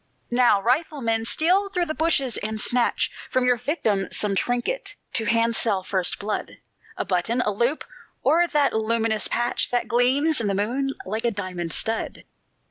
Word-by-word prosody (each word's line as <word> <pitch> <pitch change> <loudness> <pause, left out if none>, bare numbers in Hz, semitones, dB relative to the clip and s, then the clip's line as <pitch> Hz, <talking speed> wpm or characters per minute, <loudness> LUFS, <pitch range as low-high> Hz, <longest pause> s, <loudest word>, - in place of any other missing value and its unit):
"Now, 240 -4 +4
rifleman, 240 -2 0
steal 370 - +2
through 360 -2 -1
the 310 - -3
bushes, 300 -7 +1
and 215 +1 -4
snatch 245 +2 +1 0.2
From 255 -1 +1
your 250 -1 +3
victim 225 - -1
some 205 -2 +1
trinket 245 - -1 0.2
to 225 - +1
handsel 230 -3 +2
first 185 -1 0
blood; 210 +1 -4 0.4
A - - -2
button, 195 +6 0
a 210 - 0
loop, 240 +9 0 0.4
or 345 +2 +4
that 295 -4 +1
luminous 220 -1 0
patch 240 +1 -1
That 245 -1 -1
gleams 260 +5 +2
in 215 - -1
the 200 - 0
moon 260 +7 -1
like 220 +4 -3
a 240 - +2
diamond 185 -5 -4
stud!" 225 0 -1
235 Hz, 160 wpm, -24 LUFS, 210-270 Hz, 0.4 s, Now